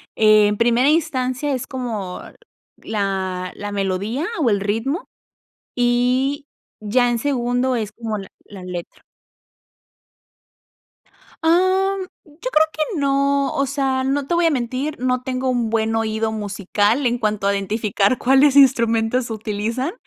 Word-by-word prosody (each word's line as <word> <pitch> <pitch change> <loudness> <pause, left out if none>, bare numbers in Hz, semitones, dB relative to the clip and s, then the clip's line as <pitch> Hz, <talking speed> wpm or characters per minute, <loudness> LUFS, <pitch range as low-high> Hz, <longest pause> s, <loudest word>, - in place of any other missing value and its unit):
En 215 -1 +4
primera 240 +4 +3
instancia 290 -3 0
es 255 - -4
como 225 -9 -5 0.6
la 190 -3 -3
la 205 0 -6
melodía 200 - -2
o 255 -8 +2
el 200 - +2
ritmo, 225 - -2 0.7
y 250 +4 +1 0.3
ya 245 +4 +2
en 235 - 0
segundo 250 -1 0
es 215 -2 -3
como 220 -2 -4
la 195 - -8 0.2
la 195 -3 -11
letra. 180 -1 -7 2.4
Am, 375 +3 +2 0.2
yo 300 -2 -20 0.2
creo 315 +1 +4
que 310 +2 -2
no, 280 0 +1
o 275 - +1
sea, 270 -1 -1
no 275 +1 -1
te - - -1
voy 345 - +2
a 330 - +5
mentir, 265 +3 -2
no 255 0 0
tengo 260 0 -2
un 240 -3 0
buen 225 0 0
oído 220 0 -1
musical 210 +4 0
en 240 0 +1
cuanto 210 -3 -1
a 200 - +2
identificar 205 +2 0
cuáles 270 +2 +4
instrumentos 235 -2 +3
utilizan, 225 - -3
245 Hz, 135 wpm, -20 LUFS, 215-275 Hz, 2.4 s, a